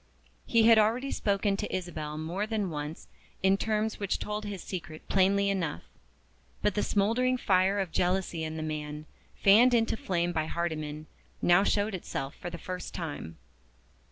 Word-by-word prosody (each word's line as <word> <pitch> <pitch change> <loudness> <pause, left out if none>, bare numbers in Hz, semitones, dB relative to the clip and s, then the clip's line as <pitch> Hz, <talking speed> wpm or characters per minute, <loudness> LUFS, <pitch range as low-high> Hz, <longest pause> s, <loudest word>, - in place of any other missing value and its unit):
He 230 -1 +4
had 225 0 +7
already 235 +6 +2
spoken 200 0 +1
to - - -4
Isabel 155 -5 -4
more 175 +7 -2
than 210 -5 -1
once 150 +1 -5 0.4
in 190 0 +5
terms 215 +1 -1
which 200 -2 -1
told 210 0 -4
his 200 -3 -5
secret 175 -4 -7
plainly 200 +1 +3
enough. 180 - -1 0.8
But 210 - +2
the 210 - 0
smouldering 230 +7 +2
fire 190 -2 +2
of 190 -4 -2
jealousy 180 -2 0
in 160 0 -4
the 155 - -3
man, 150 -1 -4 0.4
fanned 235 +5 +7
into 225 -1 +2
flame 175 -4 -1
by 155 -2 -1
Hardyman, 155 -3 -3 0.3
now 175 +2 +5
showed 205 +1 +1
itself 140 -6 -4
for 175 - -7
the 170 - -7
first 185 +1 -6
time. 145 - -5
190 Hz, 160 wpm, -29 LUFS, 160-210 Hz, 0.8 s, had